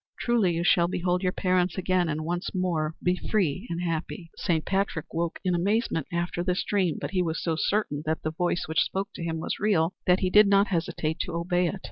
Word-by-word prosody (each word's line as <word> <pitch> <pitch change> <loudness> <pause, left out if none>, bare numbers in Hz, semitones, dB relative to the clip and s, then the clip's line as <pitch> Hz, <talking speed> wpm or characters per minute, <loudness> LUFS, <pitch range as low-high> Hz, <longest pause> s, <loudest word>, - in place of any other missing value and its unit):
Truly 225 -7 +2
you 170 - -1
shall 175 0 +4
behold 180 0 0
your 185 -1 +1
parents 180 -1 +1
again 185 -2 +1
and 155 0 -2
once 175 +3 -3
more 165 -4 0
be 180 0 +3
free 185 -6 0
and 170 +1 -3
happy." 165 0 -4
Saint 160 -3 0
Patrick 190 -5 -1
woke 170 0 -1
in 185 - +1
amazement 190 - 0
after 175 0 -2
this 180 0 0
dream, 185 -7 0
but - - -4
he 185 -2 +1
was 165 -2 -1
so 165 -2 0
certain 160 -3 0
that 160 0 -1
the 155 - -1
voice 175 +1 -1
which 160 0 +2
spoke 195 +1 -1
to - - -6
him 165 -1 -2
was 160 - -3
real 185 -5 +2
that 180 +1 +4
he 185 -1 +1
did 210 +1 +7
not 200 +1 +4
hesitate 165 -2 -2
to 175 - -3
obey 175 +1 +1
it. 195 +3 -4
175 Hz, 220 wpm, -27 LUFS, 165-185 Hz, -, did